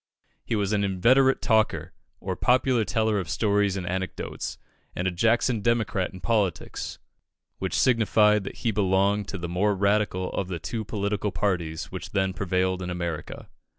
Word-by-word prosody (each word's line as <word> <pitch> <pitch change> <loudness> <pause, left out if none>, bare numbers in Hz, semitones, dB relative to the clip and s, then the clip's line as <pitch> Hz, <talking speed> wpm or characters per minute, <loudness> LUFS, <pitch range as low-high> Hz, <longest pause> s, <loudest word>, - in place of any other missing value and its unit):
He - - -2
was 100 -1 0
an 100 -1 +1
inveterate 125 +8 +3
talker, 90 -7 +1 0.3
or 95 -1 -3
popular 125 +1 +2
teller 110 +2 +1
of 90 -6 -5
stories 100 0 +1
and 90 - -4
anecdotes, 95 +1 -4 0.4
and 90 - -1
a - - +1
Jackson 115 +4 +2
Democrat 110 -4 0
in 95 - -11
politics, 100 -1 -1 0.6
which - - -2
signified 105 -3 +4
that - - -6
he 115 - +3
belonged 100 0 +1
to 100 - -4
the 85 -1 -4
more 100 +4 +1
radical 100 -2 +1
of 95 - -2
the 90 -2 -3
two 95 +9 -4
political 105 -1 -2
parties 85 -7 -2
which - - -7
then 95 -1 +1
prevailed 95 -1 0
in 90 - -4
America. 85 -3 -5
100 Hz, 160 wpm, -26 LUFS, 90-110 Hz, 0.6 s, signified